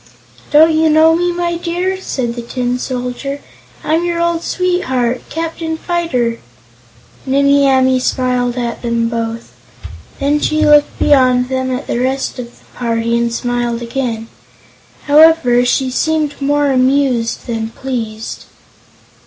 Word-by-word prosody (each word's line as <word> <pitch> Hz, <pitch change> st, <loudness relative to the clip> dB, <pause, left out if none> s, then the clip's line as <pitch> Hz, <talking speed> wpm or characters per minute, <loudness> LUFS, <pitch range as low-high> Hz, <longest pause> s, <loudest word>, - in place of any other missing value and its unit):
"Don't 315 Hz, +2 st, +5 dB
you 315 Hz, 0 st, +3 dB
know 315 Hz, +1 st, +5 dB
me, 350 Hz, +1 st, 0 dB
my 345 Hz, -1 st, -2 dB
dear?" 360 Hz, +3 st, -2 dB
said 245 Hz, -9 st, -3 dB
the 240 Hz, -, -6 dB
Tin 245 Hz, +1 st, -3 dB
Soldier. 255 Hz, +3 st, -4 dB, 0.4 s
"I'm 320 Hz, +2 st, +1 dB
your 345 Hz, -1 st, -1 dB
old 340 Hz, -1 st, 0 dB
sweetheart, 260 Hz, -11 st, -1 dB
Captain 325 Hz, 0 st, -4 dB
Fyter!" 285 Hz, -10 st, -1 dB, 0.9 s
Nimmie 280 Hz, +1 st, +3 dB
Amee 260 Hz, -1 st, +3 dB
smiled 250 Hz, -1 st, -1 dB
at 240 Hz, -1 st, -3 dB
them 235 Hz, -1 st, -1 dB
both. 230 Hz, 0 st, -4 dB, 0.7 s
Then 290 Hz, +2 st, +1 dB
she 310 Hz, +1 st, +1 dB
looked 295 Hz, -1 st, +4 dB
beyond 255 Hz, -3 st, +3 dB
them 260 Hz, 0 st, -1 dB
at 255 Hz, +2 st, -3 dB
the -, -, -2 dB
rest 265 Hz, +1 st, -2 dB
of 245 Hz, -, -5 dB
the -, -, -25 dB
party 230 Hz, -1 st, -1 dB
and 235 Hz, 0 st, 0 dB
smiled 240 Hz, 0 st, -2 dB
again. 235 Hz, -2 st, -3 dB, 0.8 s
However, 295 Hz, -5 st, +5 dB
she 255 Hz, +1 st, +1 dB
seemed 305 Hz, +1 st, -1 dB
more 290 Hz, 0 st, +1 dB
amused 255 Hz, -3 st, +1 dB
than 225 Hz, -2 st, -3 dB
pleased. 225 Hz, -3 st, -5 dB
260 Hz, 135 wpm, -15 LUFS, 240-310 Hz, 0.9 s, Don't